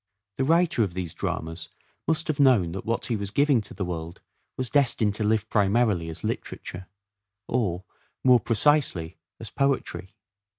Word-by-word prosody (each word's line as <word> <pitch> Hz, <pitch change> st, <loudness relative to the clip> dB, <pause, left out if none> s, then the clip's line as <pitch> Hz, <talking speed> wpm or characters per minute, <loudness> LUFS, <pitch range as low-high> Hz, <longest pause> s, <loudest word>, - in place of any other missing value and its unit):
The 135 Hz, -, +1 dB
writer 165 Hz, -3 st, +3 dB
of 90 Hz, -4 st, -4 dB
these 90 Hz, -4 st, -4 dB
dramas 80 Hz, +1 st, -4 dB, 0.4 s
must 160 Hz, 0 st, 0 dB
have 155 Hz, -3 st, -2 dB
known 120 Hz, -12 st, +4 dB
that 95 Hz, +4 st, -6 dB
what 115 Hz, -, -1 dB
he 120 Hz, -, -1 dB
was 100 Hz, -2 st, -3 dB
giving 140 Hz, +1 st, +3 dB
to -, -, -12 dB
the 95 Hz, -, -3 dB
world 85 Hz, -1 st, -6 dB, 0.4 s
was 130 Hz, -2 st, -3 dB
destined 120 Hz, -7 st, +2 dB
to 105 Hz, -, -1 dB
live 110 Hz, 0 st, +1 dB
primarily 105 Hz, -5 st, +2 dB
as 80 Hz, -, -7 dB
literature, 90 Hz, +1 st, -5 dB, 0.6 s
or, 95 Hz, -7 st, -1 dB, 0.4 s
more 125 Hz, -2 st, +6 dB
precisely, 115 Hz, -, +2 dB, 0.2 s
as 115 Hz, -3 st, -8 dB
poetry. 135 Hz, -7 st, -1 dB
110 Hz, 160 wpm, -26 LUFS, 90-130 Hz, 0.6 s, more